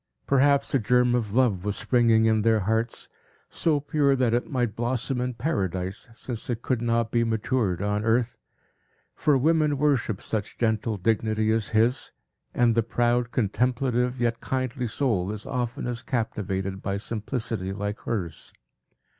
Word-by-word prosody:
Perhaps 140 Hz, +1 st, +3 dB
a 135 Hz, -, +4 dB
germ 125 Hz, +2 st, +3 dB
of 110 Hz, -4 st, -1 dB
love 115 Hz, -8 st, +2 dB
was 105 Hz, 0 st, -1 dB
springing 115 Hz, -3 st, +3 dB
in 110 Hz, -1 st, +3 dB
their 110 Hz, 0 st, +3 dB
hearts, 110 Hz, +4 st, -1 dB, 0.4 s
so 155 Hz, -3 st, +1 dB
pure 145 Hz, -1 st, +2 dB
that 125 Hz, -3 st, +1 dB
it 120 Hz, -, 0 dB
might 120 Hz, -5 st, -1 dB
blossom 125 Hz, +2 st, -1 dB
in 125 Hz, -1 st, -2 dB
Paradise, 95 Hz, -, -2 dB
since 115 Hz, 0 st, -7 dB
it 120 Hz, -1 st, -3 dB
could 125 Hz, -3 st, 0 dB
not 115 Hz, -1 st, 0 dB
be 115 Hz, -1 st, +2 dB
matured 110 Hz, -4 st, 0 dB
on 105 Hz, +1 st, 0 dB
earth; 115 Hz, +2 st, +1 dB, 0.8 s
for 150 Hz, -3 st, +2 dB
women 150 Hz, +1 st, +2 dB
worship 135 Hz, -8 st, +1 dB
such 110 Hz, -2 st, -4 dB
gentle 110 Hz, -1 st, 0 dB
dignity 110 Hz, +2 st, +1 dB
as 110 Hz, -3 st, 0 dB
his; 115 Hz, +3 st, +1 dB, 0.4 s
and 120 Hz, -1 st, +4 dB
the 115 Hz, -, +3 dB
proud, 120 Hz, +1 st, +1 dB
contemplative, 125 Hz, +3 st, 0 dB
yet 120 Hz, -1 st, 0 dB
kindly 130 Hz, -1 st, -2 dB
soul 110 Hz, -6 st, 0 dB
is 105 Hz, 0 st, -6 dB
oftenest 120 Hz, -1 st, -3 dB
captivated 95 Hz, -, -2 dB
by 100 Hz, 0 st, -2 dB
simplicity 110 Hz, -2 st, -3 dB
like 105 Hz, +2 st, -4 dB
hers. 90 Hz, -9 st, -4 dB
115 Hz, 150 wpm, -26 LUFS, 110-125 Hz, 0.8 s, a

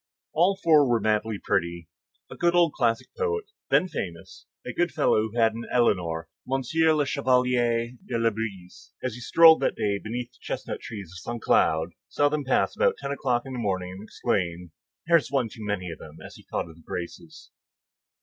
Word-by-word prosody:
_ -, -, -67 dB, 0.3 s
All 190 Hz, +4 st, +3 dB
four 150 Hz, -5 st, +5 dB
were 120 Hz, -1 st, +3 dB
madly 110 Hz, 0 st, 0 dB
pretty. 85 Hz, -3 st, -1 dB, 0.4 s
A -, -, -7 dB
good 175 Hz, 0 st, +2 dB
old 170 Hz, -3 st, +4 dB
classic 115 Hz, -2 st, 0 dB
poet, 445 Hz, -2 st, -2 dB, 0.2 s
then 185 Hz, -, +4 dB
famous, 90 Hz, -, -7 dB, 0.2 s
a -, -, -5 dB
good -, -, +1 dB
fellow 110 Hz, +1 st, +2 dB
who 115 Hz, -, -9 dB
had 115 Hz, -1 st, +4 dB
an 115 Hz, +1 st, -6 dB
Éléonore, 90 Hz, -9 st, +1 dB, 0.3 s
M. 135 Hz, 0 st, +1 dB, 0.3 s
le 145 Hz, -, +2 dB
Chevalier 125 Hz, -3 st, +1 dB
de 120 Hz, -, -3 dB
Labouisse, 110 Hz, -5 st, -3 dB
as 130 Hz, -3 st, -2 dB
he 125 Hz, -, -8 dB
strolled 160 Hz, +6 st, +7 dB
that -, -, 0 dB
day 100 Hz, -1 st, 0 dB
beneath 120 Hz, +3 st, -5 dB
the -, -, -27 dB
chestnut -, -, -5 dB
trees 100 Hz, -6 st, -8 dB
of 90 Hz, -, -9 dB
Saint 120 Hz, +5 st, -6 dB
Cloud, 80 Hz, +1 st, +3 dB, 0.2 s
saw 145 Hz, 0 st, +2 dB
them 150 Hz, 0 st, -1 dB
pass 130 Hz, -, +1 dB
about 485 Hz, 0 st, +3 dB
ten -, -, -5 dB
o'clock 125 Hz, -3 st, 0 dB
in 135 Hz, -, -7 dB
the 125 Hz, -, -4 dB
morning, 95 Hz, -4 st, -2 dB
and 95 Hz, +1 st, -9 dB
exclaimed, 90 Hz, -5 st, -2 dB, 0.3 s
"There 170 Hz, 0 st, +6 dB
is 145 Hz, -, -3 dB
one 130 Hz, -5 st, +1 dB
too 110 Hz, 0 st, -10 dB
many 100 Hz, -4 st, -3 dB
of 80 Hz, -, -9 dB
them," 80 Hz, 0 st, -12 dB
as -, -, -10 dB
he -, -, -16 dB
thought -, -, -2 dB
of 80 Hz, -1 st, -14 dB
the -, -, -17 dB
Graces. 85 Hz, +2 st, -8 dB
115 Hz, 200 wpm, -26 LUFS, 95-140 Hz, 0.4 s, strolled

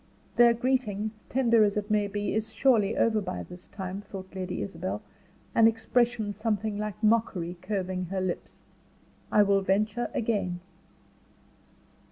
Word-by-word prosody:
"Their 235 Hz, -1 st, +6 dB
greeting, 225 Hz, -4 st, 0 dB, 0.2 s
tender 235 Hz, -4 st, +4 dB
as 205 Hz, 0 st, +1 dB
it 210 Hz, +1 st, -3 dB
may 210 Hz, -1 st, +2 dB
be, 205 Hz, +1 st, -2 dB
is 220 Hz, +1 st, -1 dB
surely 220 Hz, -3 st, +3 dB
over 220 Hz, -2 st, +3 dB
by 90 Hz, -, -4 dB
this 180 Hz, -, -12 dB
time," 190 Hz, -1 st, -6 dB
thought 190 Hz, -2 st, -9 dB
Lady 185 Hz, -1 st, -3 dB
Isabel, 185 Hz, +3 st, -4 dB, 0.5 s
an 225 Hz, -1 st, +6 dB
expression 225 Hz, -1 st, +1 dB
something 210 Hz, 0 st, -1 dB
like 210 Hz, 0 st, -5 dB
mockery 210 Hz, -6 st, +1 dB
curving 185 Hz, -2 st, -2 dB
her 190 Hz, +2 st, -3 dB
lips. 185 Hz, -1 st, -4 dB, 0.7 s
"I 210 Hz, -, +6 dB
will 200 Hz, -1 st, +3 dB
venture 210 Hz, +5 st, 0 dB
again." 205 Hz, -8 st, -1 dB
210 Hz, 140 wpm, -28 LUFS, 190-225 Hz, 0.7 s, Their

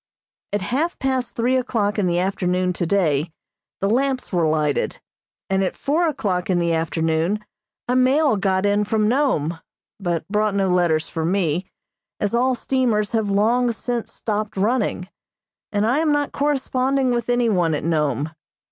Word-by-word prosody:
At 205 Hz, -2 st, -1 dB
half 290 Hz, -, -1 dB
past 260 Hz, -2 st, -1 dB
three 245 Hz, +3 st, +1 dB
o'clock 220 Hz, -5 st, 0 dB
in 190 Hz, -, +1 dB
the 175 Hz, 0 st, +1 dB
afternoon 180 Hz, -1 st, 0 dB
today 170 Hz, -4 st, +1 dB, 0.5 s
the 195 Hz, -, +2 dB
lamps 260 Hz, +1 st, 0 dB
were 170 Hz, -3 st, +2 dB
lighted, 150 Hz, -2 st, 0 dB, 0.5 s
and 190 Hz, 0 st, +1 dB
at 185 Hz, -, -2 dB
four 325 Hz, +5 st, +1 dB
o'clock 195 Hz, -, -1 dB
in 185 Hz, -, +2 dB
the 170 Hz, -1 st, +1 dB
afternoon 165 Hz, +5 st, 0 dB, 0.4 s
a 250 Hz, -, +1 dB
mail 260 Hz, +1 st, +4 dB
got 195 Hz, -1 st, +1 dB
in 205 Hz, +1 st, +2 dB
from 215 Hz, 0 st, +1 dB
Nome, 215 Hz, -, +1 dB, 0.4 s
but 170 Hz, -4 st, -2 dB
brought 210 Hz, 0 st, 0 dB
no 195 Hz, -1 st, +1 dB
letters 175 Hz, -3 st, +2 dB
for 160 Hz, -, -4 dB
me, 175 Hz, 0 st, 0 dB, 0.5 s
as 205 Hz, 0 st, -1 dB
all 255 Hz, +2 st, +2 dB
steamers 235 Hz, -5 st, 0 dB
have 220 Hz, -3 st, 0 dB
long 235 Hz, +5 st, +2 dB
since 235 Hz, 0 st, -3 dB
stopped 210 Hz, -2 st, -3 dB
running, 210 Hz, -3 st, 0 dB, 0.6 s
and 205 Hz, 0 st, +1 dB
I 250 Hz, +6 st, +2 dB
am 315 Hz, -1 st, +2 dB
not 290 Hz, -1 st, 0 dB
corresponding 270 Hz, -2 st, 0 dB
with 240 Hz, -1 st, -1 dB
any 245 Hz, -1 st, +2 dB
one 175 Hz, -7 st, +2 dB
at -, -, -4 dB
Nome. 150 Hz, -3 st, 0 dB
205 Hz, 160 wpm, -22 LUFS, 175-250 Hz, 0.6 s, mail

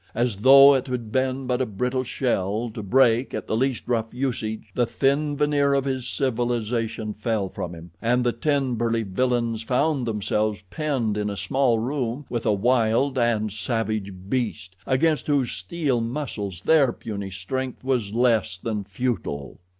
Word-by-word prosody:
As 120 Hz, -3 st, 0 dB
though 135 Hz, +5 st, +8 dB
it 130 Hz, -1 st, 0 dB
had 120 Hz, -4 st, -4 dB
been 130 Hz, +1 st, 0 dB
but 125 Hz, 0 st, 0 dB
a -, -, +2 dB
brittle 125 Hz, +5 st, -1 dB
shell, 115 Hz, -3 st, -1 dB
to 110 Hz, -, -5 dB
break 120 Hz, +3 st, +3 dB
at -, -, -4 dB
the -, -, -1 dB
least 130 Hz, +1 st, 0 dB
rough 115 Hz, -2 st, 0 dB
usage, 115 Hz, -4 st, -2 dB
the 120 Hz, +1 st, +1 dB
thin 145 Hz, +3 st, +1 dB
veneer 145 Hz, -1 st, +2 dB
of 140 Hz, -1 st, +1 dB
his 130 Hz, -2 st, -2 dB
civilization 115 Hz, -4 st, -1 dB
fell 105 Hz, -2 st, -1 dB
from 85 Hz, -1 st, -5 dB
him, 85 Hz, +1 st, -12 dB
and 125 Hz, +2 st, +2 dB
the 120 Hz, -, +2 dB
ten 135 Hz, +1 st, 0 dB
burly 115 Hz, 0 st, 0 dB
villains 115 Hz, +2 st, 0 dB
found 130 Hz, +2 st, 0 dB
themselves 105 Hz, -1 st, -1 dB
penned 130 Hz, -9 st, -1 dB
in 105 Hz, 0 st, -1 dB
a 100 Hz, -, -5 dB
small 120 Hz, +6 st, +1 dB
room 125 Hz, +2 st, -2 dB
with 120 Hz, -2 st, -2 dB
a -, -, +4 dB
wild 120 Hz, +5 st, +2 dB
and 110 Hz, -3 st, +1 dB
savage 110 Hz, -1 st, -2 dB, 0.2 s
beast, 105 Hz, -6 st, -2 dB
against 155 Hz, +4 st, +2 dB
whose 140 Hz, -5 st, +1 dB
steel 130 Hz, -, -1 dB
muscles 115 Hz, -, -4 dB
their 150 Hz, -6 st, +4 dB
puny 100 Hz, -4 st, -6 dB
strength 130 Hz, +9 st, -4 dB
was 125 Hz, -6 st, 0 dB
less 115 Hz, -5 st, +2 dB
than 105 Hz, +1 st, -3 dB
futile. 95 Hz, -, -3 dB
120 Hz, 165 wpm, -24 LUFS, 110-130 Hz, 0.2 s, though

